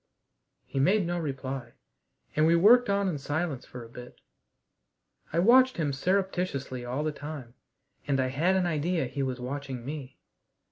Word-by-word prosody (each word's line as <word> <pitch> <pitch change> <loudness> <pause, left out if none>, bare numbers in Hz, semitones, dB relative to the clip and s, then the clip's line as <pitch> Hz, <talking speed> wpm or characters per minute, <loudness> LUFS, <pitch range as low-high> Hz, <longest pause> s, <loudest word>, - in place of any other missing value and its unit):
He 135 - -3
made 190 +7 +3
no 175 +1 -1
reply, 135 -5 -5 0.6
and 155 +1 +4
we 165 - +5
worked 235 +7 +6
on 200 0 +2
in 160 -6 -2
silence 145 -1 -3
for 125 -1 -9
a - - -11
bit. 125 +1 -11 1.1
I 165 - -2
watched 255 +8 +5
him 150 -4 0
surreptitiously 180 -6 -1
all 125 +4 -2
the 155 - 0
time, 145 -5 -8 0.5
and 135 -2 +1
I 130 0 +1
had 165 +8 +2
an 185 -1 +2
idea 165 -1 0
he 135 +3 -4
was 130 -1 -2
watching 130 -1 -5
me. 140 -2 -7
145 Hz, 160 wpm, -28 LUFS, 130-175 Hz, 1.1 s, worked